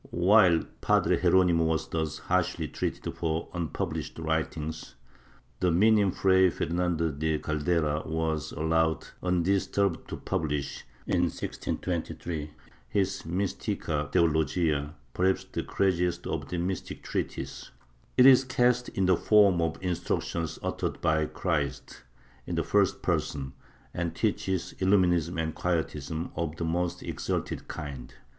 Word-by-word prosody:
While 90 -1 +5 0.2
Padre - - +2
Geronimo 90 -3 +4
was 80 0 0
thus 80 -2 -2
harshly - - 0
treated - - -3
for 80 0 -2
unpublished 85 -4 -3
writings, 80 -3 -3 0.6
the 90 - +2
Minim 105 +3 +4
Fray 95 0 +4
Fernando 85 -1 0
de 75 +2 -1
Caldera 75 0 0
was 80 -2 -1
allowed 80 +1 +1 0.2
undisturbed 90 0 +1
to - - -4
pubhsh, 75 -3 -2 0.2
in 90 -1 +2
1623, 85 -2 -4 0.4
his 95 -1 0
Mistica 85 -5 -2
Teologia, 80 -1 +1 0.2
perhaps 95 +1 +1
the - - -4
craziest 90 -3 0
of - - -3
the 90 - -3
mystic 90 +2 -3
treatises. 70 +1 -4 0.5
It 125 - +7
is 135 -1 +8
ca 125 -1 +3
st 125 0 -5
in 95 - +3
the 95 0 +5
form 100 -3 +4
of 80 -1 -1
instructions 85 -2 -2
uttered - - -2
by 80 -1 +2
Christ, 75 -6 -3 0.5
in - - -2
the - - +1
first - - +2
person, 65 -2 -1 0.4
and 85 -1 -2
teaches 95 -2 -1
Illuminism 90 -3 +2
and 80 -1 -1
Quietism 80 -2 -2
of 80 -1 -2
the 85 - -3
most 85 +2 -1
exalted - - -3
kind. 70 -4 -7
85 Hz, 125 wpm, -28 LUFS, 80-90 Hz, 0.6 s, is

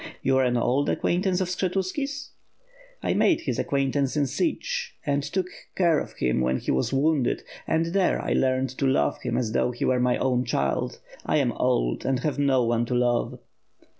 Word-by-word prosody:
"You 130 - +3
axe 130 - +3
an 120 0 +1
old 130 +4 +1
acquaintance 185 +1 +1
of 185 - 0
Skshetuski's?" 195 +10 -2 0.7
"I - - +1
made 335 - +3
his 125 -4 -2
acquaintance 140 0 0
in 145 - +3
Sich 485 - -2
and 140 0 +1
took 185 +6 -2 0.3
care 170 -4 +3
of - - -7
him 65 0 0
when 65 +1 +1
he - - -2
was 65 - 0
wounded; 140 -1 +1 0.2
and 160 +1 +1
there 195 -2 +2
I - - -1
learned 130 0 +1
to 135 - +2
love 75 - +1
him - - -2
as 115 -3 -1
though 120 - +1
he 120 - -3
were 130 -1 +2
my 125 0 +2
own 125 -1 +1
child. 70 - -1 0.2
I - - +1
am - - +2
old - - 0
and 135 -1 +1
have 150 -1 -1
no 135 -3 +3
one 120 0 +1
to 125 - -1
love." 120 -1 +1
135 Hz, 195 wpm, -25 LUFS, 125-180 Hz, 0.7 s, You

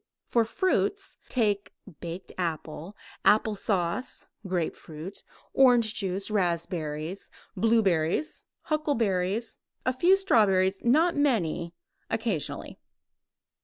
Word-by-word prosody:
For 235 -2 +2
fruits: 390 - 0
take 205 -5 0 0.3
baked 175 +2 -7
apple, 165 +2 -4 0.3
applesauce, 205 -1 +1 0.2
grapefruit, 170 0 -4 0.3
orange 245 -5 +5
juice, 195 -2 -3
raspberries, 170 -3 -2 0.3
blueberries, 210 - +1 0.2
huckleberries, 225 - 0 0.3
a 255 - +2
few 350 +9 +5
strawberries 195 - +3
not 315 +8 +4
many 175 - 0 0.3
occasionally. 220 -9 -2
200 Hz, 80 wpm, -28 LUFS, 175-240 Hz, 0.3 s, orange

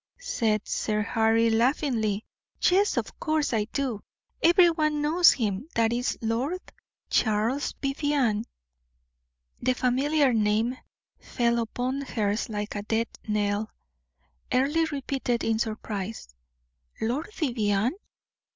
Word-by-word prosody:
said 230 - -1
Sir 215 -1 -1
Harry, 225 +1 +2
laughingly; 225 -3 +1 0.3
"yes, 395 +3 +3
of - - -3
course 310 -4 0
I 215 -2 +1
do 255 -7 -2 0.4
every 345 +1 +6
one 305 -2 0
knows 340 +4 +6
him. 215 +1 -2
That 230 0 +2
is 245 +1 -1
Lord 245 +10 -1 0.5
Charles 225 +6 +1
Vivianne." 275 -6 +1 1.2
The 255 +1 +2
familiar 270 +2 +2
name 220 +3 +1 0.4
fell 235 -1 0
upon 250 +4 -2
her 220 -6 -1
ears 215 +3 -2
like 210 -1 -4
a 205 - -3
death 225 +2 -1 0.2
knell. 210 0 0 0.8
Earle 295 +6 +2
repeated 270 -4 -2
in 225 -1 +1
surprise: 215 - -4 0.7
"Lord 260 - -2
Vivianne! 235 - 0
235 Hz, 115 wpm, -27 LUFS, 220-285 Hz, 1.2 s, every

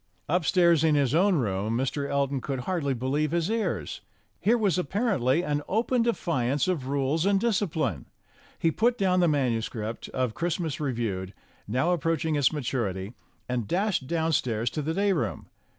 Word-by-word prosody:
Upstairs 170 -1 +3
in 155 -2 +4
his 140 -3 +2
own 185 +4 +4
room 110 - 0
Mr. 140 +2 -2
Elton 140 -1 0
could 135 -2 -3
hardly 140 -3 -1
believe 140 +5 0
his 170 +4 0
ears. 225 -1 -2 0.4
Here 230 +4 +3
was, 200 -5 +1
apparently, 175 - +1
an 145 -2 -1
open 235 +4 +1
defiance 150 - 0
of 160 -8 -1
rules 140 +3 0
and 200 0 +3
discipline. 160 - -1 0.5
He 165 - +2
put 235 +7 +1
down 185 -2 +2
the 175 - +4
manuscript 115 -6 -1
of 125 -3 -1
"Christmas 170 - -2
Reviewed," 115 -9 -3 0.3
now 130 - +1
approach 165 -1 0
ing 160 -1 +1
its 145 -3 +3
maturity, 115 - -3 0.3
and 125 -4 -2
dashed 185 - 0
downstairs 130 -9 0
to 155 - -3
the 160 +3 -2
day 200 0 +2
room. 165 - -2
150 Hz, 160 wpm, -27 LUFS, 125-180 Hz, 0.5 s, in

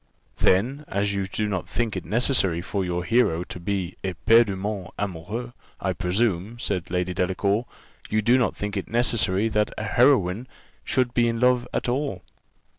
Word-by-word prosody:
"Then, 125 +11 +2
as 100 +1 -1
you 100 -1 -1
do 105 +2 -2
not 95 -4 -3
think 115 -4 -1
it 95 - -4
necessary 105 - +2
for 95 +2 -2
your 90 -1 -2
hero 95 -7 +2
to 90 - -8
be 95 0 -3
éperdument 100 0 +2
amoureux, 105 +6 -4 0.3
I - - -1
presume," 100 +2 -1
said 95 -6 -3
Lady 90 0 -1
Delacour, 100 +5 0 0.4
"you 110 0 +1
do 125 +4 +4
not 125 - +1
think 105 0 -4
it 95 - -3
necessary 115 -3 +2
that 105 -1 +1
a - - -3
heroine 115 -2 +3 0.4
should 125 -3 0
be 120 -1 +3
in 115 0 -1
love 125 0 +3
at - - -2
all. 125 -6 -2
105 Hz, 165 wpm, -25 LUFS, 95-120 Hz, 0.4 s, do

